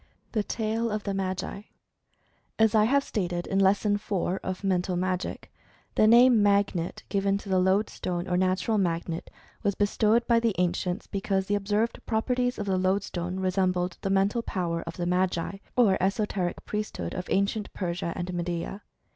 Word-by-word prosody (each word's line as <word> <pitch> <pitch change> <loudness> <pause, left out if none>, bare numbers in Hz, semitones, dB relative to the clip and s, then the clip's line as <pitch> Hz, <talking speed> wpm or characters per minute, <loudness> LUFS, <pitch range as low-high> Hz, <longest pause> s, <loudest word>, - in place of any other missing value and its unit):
THE 220 - +1
TALE 225 +2 -1
OF 210 -1 -2
THE 200 - -2
MAGI. 190 +2 -3 0.9
As 220 -1 +4
I 215 -1 +5
have 275 +4 +3
stated 175 -7 -2
in 195 - 0
Lesson 200 +2 +3
IV, 205 +1 -4 0.3
of 185 +1 -5
"Mental 185 -1 0
Magic," 185 +1 -3 0.4
the 215 - +4
name 240 0 +7
"Magnet," 200 -4 +1
given 200 -1 +1
to 200 - -9
the 190 -1 +3
Lodestone, 185 -2 0
or 180 - 0
nat 185 0 +1
ural 220 -2 +2
magnet,. 170 -2 -2 0.3
was 200 -1 0
bestowed 215 +3 +2
by 235 -1 +4
the 230 -3 0
ancients 180 +2 -1
because 195 -1 -1
the 205 - -1
observed 205 +3 0
properties 245 +2 0
of 205 - -3
the 190 -2 +1
lodestone 185 -1 -1
resembled 185 -1 0
the 195 - -2
mental 195 +4 +2
power 170 -6 -2
of 165 - -6
the 175 - -2
Magi 180 +1 0 0.2
or 220 -6 +4
esoteric 195 -2 -1
priesthood 210 - -4
of 180 - -5
ancient 200 +2 0
Persia 170 -2 -3
and 180 0 -4
Medea. 175 +3 -3
195 Hz, 165 wpm, -27 LUFS, 180-210 Hz, 0.9 s, name